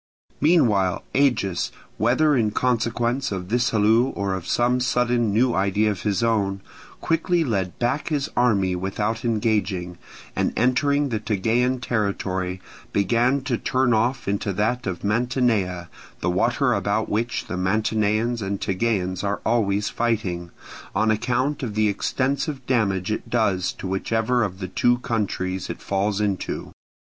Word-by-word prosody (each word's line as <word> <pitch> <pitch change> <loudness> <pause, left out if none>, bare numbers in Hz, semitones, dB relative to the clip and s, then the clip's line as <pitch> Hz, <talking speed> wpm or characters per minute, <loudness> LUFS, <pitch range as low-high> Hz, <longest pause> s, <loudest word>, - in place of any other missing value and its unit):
Meanwhile 110 - +3
Agis, 120 -10 +1 0.3
whether 135 +8 +3
in 115 -4 +2
consequence 120 +2 0
of 95 -2 -4
this 120 +2 +2
halloo 110 +2 +4
or 100 -1 -1
of 95 -2 -5
some 125 +1 +2
sudden 125 -2 +1
new 120 +4 +3
idea 100 +3 +2
of 95 - -5
his 105 -1 0
own, 100 -4 +1 0.4
quickly 165 +1 +1
led 95 - -2
back 125 +5 -1
his 145 -4 0
army 100 -7 +2
without 105 +5 -2
engaging, 105 -6 -1 0.4
and - - 0
entering 140 +4 +2
the 110 -3 -1
Tegean 115 +5 +1
territory, 95 -5 -2 0.3
began 120 +7 +2
to 130 -3 -2
turn 130 -2 +1
off 120 +3 0
into 100 0 -1
that 110 +4 -1
of 95 -2 -4
Mantinea 105 -5 0 0.3
the - - 0
water - - +2
about - - 0
which 115 +3 -1
the - - -6
Mantineans 110 +4 0
and 100 0 -2
Tegeans 95 -2 -1
are 100 0 -1
always 105 -3 +1
fighting, 100 -7 -1 0.5
on 110 0 +3
account 125 +6 0
of 115 -6 -4
the 110 0 +3
extensive 135 +6 -1
damage 105 -6 0
it 110 - -4
does 100 -6 +1
to - - -9
whichever 110 +6 0
of 100 -4 -2
the 95 -1 -5
two 120 +6 +2
countries 95 -6 -2
it - - -5
falls 100 +1 -1
into. 100 -3 -2
110 Hz, 145 wpm, -23 LUFS, 100-125 Hz, 0.5 s, halloo